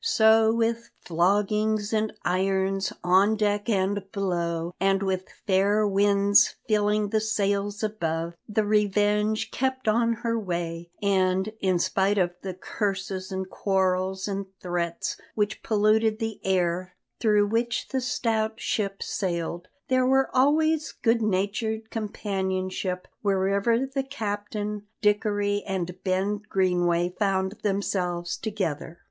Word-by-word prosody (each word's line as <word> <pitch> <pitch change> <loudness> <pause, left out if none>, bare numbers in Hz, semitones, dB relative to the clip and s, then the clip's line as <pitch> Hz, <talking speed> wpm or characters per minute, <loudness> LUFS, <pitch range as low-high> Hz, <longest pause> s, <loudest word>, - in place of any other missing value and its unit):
So 220 0 +5
with 230 0 0
floggings 205 +5 +1
and 215 0 +1
irons, 190 +1 +1
on 190 +4 +4
deck 205 +1 0
and 200 -1 +1
below, 170 -3 -2
and 195 +1 +2
with 190 -1 -2 0.2
fair 205 +2 +3
winds 200 0 +4
filling 210 -1 +2
the 215 +1 +1
sails 205 -1 -1
above, 170 -6 -2 0.2
the 210 0 +1
Revenge 210 +1 +1
kept 260 -1 -2
on 230 +2 +3
her 230 0 +1
way; 170 -3 -4
and, 190 +1 +1
in 185 -2 +2
spite 195 +3 +1
of 175 -2 +2
the 190 -2 -5
curses 195 -1 -3
and 190 0 -3
quarrels 190 0 0
and 195 -1 -3
threats 175 -1 -2 0.2
which 210 -1 -1
polluted 215 +1 +2
the 225 -1 -4
air 180 -1 0 0.2
through 210 -2 +4
which 230 +2 -1
the 265 -1 -1
stout 225 -3 -1
ship 195 -2 -2
sailed, 175 -1 -3 0.2
there 255 0 +2
was 265 +1 +4
always 305 +4 +2
good 230 0 +3
natured 220 +2 -1
companionship 190 -3 -3
wherever 200 +5 +2
the 270 0 -2
captain, 210 -5 -4
Dickory, 205 -1 +1
and 185 -1 -4
Ben 195 +2 0
Greenway 175 -2 +1
found 190 -2 +1
themselves 180 -4 -1
together. 170 -6 -4
200 Hz, 120 wpm, -26 LUFS, 185-215 Hz, 0.2 s, So